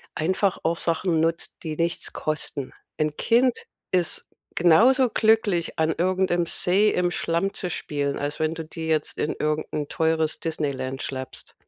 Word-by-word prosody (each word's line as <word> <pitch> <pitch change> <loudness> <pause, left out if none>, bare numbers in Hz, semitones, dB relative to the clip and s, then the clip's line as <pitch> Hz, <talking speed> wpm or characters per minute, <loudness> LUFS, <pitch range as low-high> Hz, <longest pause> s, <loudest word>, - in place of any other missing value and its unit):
einfach 185 +4 +1
auch 165 +1 +1
Sachen 165 0 0
nutzt, 165 +1 -1
die 155 -2 -3
nichts 170 +1 -1
kosten. 150 -3 -3 0.3
Ein 155 -1 -1
Kind 245 +2 +2 0.3
ist 180 -3 0 0.3
genauso 235 - +5
glücklich, 220 -7 +2
an 160 0 +2
irgendeinem 185 -1 +1
See 190 +5 +2
im 180 -3 +1
Schlamm 170 +3 -1
zu 180 - -4
spielen, 145 -4 -2
als 145 +1 -3
wenn 155 +1 +1
du 165 - -5
die 160 +1 -6
jetzt 155 -2 0
in 150 - -1
irgend 150 0 -1
'n 150 -1 -2
teures 160 -1 0
Disneyland 135 -5 -3
schleppst. 130 -1 -7
165 Hz, 155 wpm, -24 LUFS, 155-185 Hz, 0.3 s, genauso